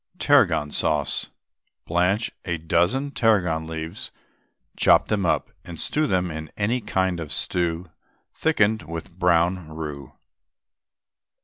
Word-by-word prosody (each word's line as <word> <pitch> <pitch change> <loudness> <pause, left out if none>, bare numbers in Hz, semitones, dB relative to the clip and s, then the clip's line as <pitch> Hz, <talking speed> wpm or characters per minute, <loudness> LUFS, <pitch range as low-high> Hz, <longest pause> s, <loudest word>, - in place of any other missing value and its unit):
TARRAGON 75 -1 +3
SAUCE. - - 0 0.6
Blanch 90 +6 +1
a 85 -1 -2
dozen 90 - +1
tarragon 95 -11 +1
leaves, 80 +4 -5 0.7
chop - - +4
them 100 -4 +1
up, - - 0
and 85 -2 -9
stew 155 0 0
them 90 -5 0
in 80 0 -6
any 115 +5 0
kind 95 -4 0
of 80 -3 -6
stock 85 -1 -1 0.4
thickened 110 -9 +2
with 85 +2 -7
brown 90 0 +1
roux. 75 -4 -7
90 Hz, 115 wpm, -24 LUFS, 80-100 Hz, 0.7 s, chop